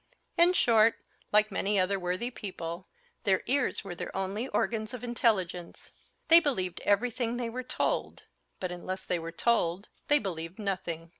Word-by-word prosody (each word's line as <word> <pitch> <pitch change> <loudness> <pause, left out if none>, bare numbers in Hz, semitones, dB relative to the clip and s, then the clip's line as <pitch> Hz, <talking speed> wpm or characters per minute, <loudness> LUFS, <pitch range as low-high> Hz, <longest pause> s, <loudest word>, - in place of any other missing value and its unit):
In 345 +1 +5
short, 225 -8 +4 0.4
like 210 0 +4
many 205 0 +1
other 195 +1 +1
worthy 185 +7 -2
people, 180 -5 -6 0.4
their 190 -4 +2
ears 280 -1 0
were 195 -3 -5
their 175 - -5
only 195 +6 -2
organs 225 -2 -1
of 250 - -9
intelligence. 195 -8 -1 0.4
They 330 +1 +9
believed 190 - -1
everything 235 +3 +1
they 235 -2 -3
were 255 +2 -4
told; 255 - -2 0.4
but 185 -1 -3
unless 185 +2 -5
they 180 - 0
were 165 0 -6
told, 190 -1 +1 0.2
they 295 - +6
believed 175 - -4
nothing. 175 -5 -3
200 Hz, 155 wpm, -29 LUFS, 180-235 Hz, 0.4 s, They